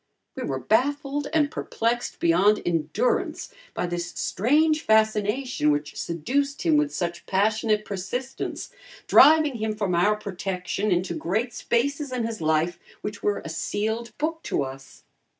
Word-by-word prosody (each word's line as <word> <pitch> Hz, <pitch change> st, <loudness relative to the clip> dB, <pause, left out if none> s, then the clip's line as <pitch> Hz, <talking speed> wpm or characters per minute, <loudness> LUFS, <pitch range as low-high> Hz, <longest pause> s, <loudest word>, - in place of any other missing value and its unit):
We -, -, -7 dB
were 135 Hz, -, -2 dB
baffled 280 Hz, -, 0 dB
and 305 Hz, -2 st, +2 dB
perplexed 235 Hz, -3 st, -2 dB
beyond 185 Hz, +5 st, +3 dB
endurance 175 Hz, -, -1 dB, 0.2 s
by -, -, -1 dB
this 175 Hz, 0 st, -3 dB
strange 305 Hz, -, +2 dB
fascination 220 Hz, -, +2 dB
which 145 Hz, 0 st, -1 dB
seduced 275 Hz, -, -2 dB
him 325 Hz, -3 st, +3 dB
with 300 Hz, -1 st, +2 dB
such 175 Hz, -1 st, -4 dB
passionate 215 Hz, +2 st, +1 dB
persistence, 245 Hz, +7 st, -4 dB, 0.3 s
driving 305 Hz, -4 st, +6 dB
him 220 Hz, -1 st, -2 dB
from 205 Hz, -4 st, -1 dB
our 200 Hz, +5 st, +3 dB
protection 195 Hz, 0 st, -3 dB
into 175 Hz, 0 st, +1 dB
great 215 Hz, +9 st, -1 dB
spaces 280 Hz, +4 st, -1 dB
in 245 Hz, -3 st, -1 dB
his 225 Hz, -4 st, -5 dB
life 160 Hz, +2 st, +1 dB, 0.2 s
which 210 Hz, -1 st, -5 dB
were 205 Hz, -, 0 dB
a -, -, -5 dB
sealed 220 Hz, +7 st, -3 dB
book 320 Hz, +2 st, -2 dB
to -, -, 0 dB
us. 135 Hz, 0 st, -10 dB
215 Hz, 140 wpm, -25 LUFS, 175-270 Hz, 0.3 s, driving